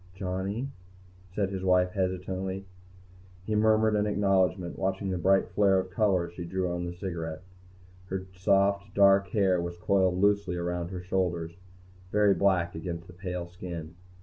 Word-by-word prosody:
"Johnny?" 95 +6 -3 0.7
said 100 -2 0
his 95 -1 -4
wife 90 -1 +3
hesitantly. 95 +1 -2 0.8
He 110 - -2
murmured 110 0 +3
an 105 0 +1
acknowledgement, 95 -3 +1
watching 95 0 -1
the 90 - -2
bright 95 +2 +3
flare 100 -2 +3
of 95 0 -2
color 95 -4 +2
as 85 - -14
she 85 - -6
drew 90 +1 -2
on 90 0 -3
the 85 - -6
cigarette. 85 -3 -5 0.6
Her 95 0 -4
soft, 100 +2 +1
dark 100 0 +5
hair 95 -2 +2
was 85 0 -5
coiled 95 0 +2
loosely 100 -2 +2
around 85 0 -2
her 90 -1 -5
shoulders, 90 -3 -1 0.6
very 105 -1 +4
black 90 -4 +2
against 85 +1 -5
the 90 - -13
pale 90 -1 -4
skin. 85 -2 -7
95 Hz, 155 wpm, -28 LUFS, 90-100 Hz, 0.8 s, dark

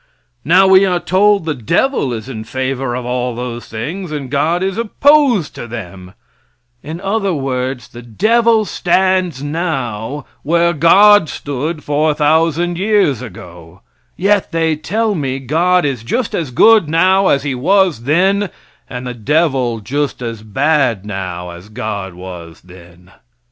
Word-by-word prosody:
Now 180 +7 +5
we 190 0 +6
are 180 -2 +1
told 200 0 +2
the 160 - -1
devil 140 - 0
is 115 0 -5
in 110 -5 -6
favor 130 +2 -3
of 125 -1 -5
all 125 0 -2
those 120 -1 -6
things, 160 - -6
and 140 -4 -5
God 160 +5 0
is 190 0 -1
opposed 240 - +2
to 120 - -8
them; 95 -5 -9 0.7
in 160 +4 -7
other 195 -1 -1
words, 130 -2 -3
the 120 - -11
devil 220 - +2
stands 185 -6 0
now 145 -5 -3 0.2
where 170 +2 +2
God 190 +3 +5
stood 150 +3 -4
4,000 155 +3 +1
years 195 - +2
ago; 90 -6 -12 0.4
yet 200 +1 +1
they 165 -1 +1
tell 210 +8 -1
me 135 -7 -2
God 165 +6 +1
is 135 -5 -2
just 235 - -2
as 160 -6 -2
good 210 - +4
now 185 +4 +3
as 140 - +2
he 140 -2 -2
was 170 - +1
then, 190 +7 +2 0.4
and 125 0 -6
the 125 - -4
devil 130 -2 0
just 140 +3 -3
as 115 -2 -5
bad 120 -1 0
now 90 -3 -5
as 90 +4 -12
God 105 -5 -5
was 90 -2 -10
then. 90 0 -17
145 Hz, 145 wpm, -16 LUFS, 120-180 Hz, 0.7 s, we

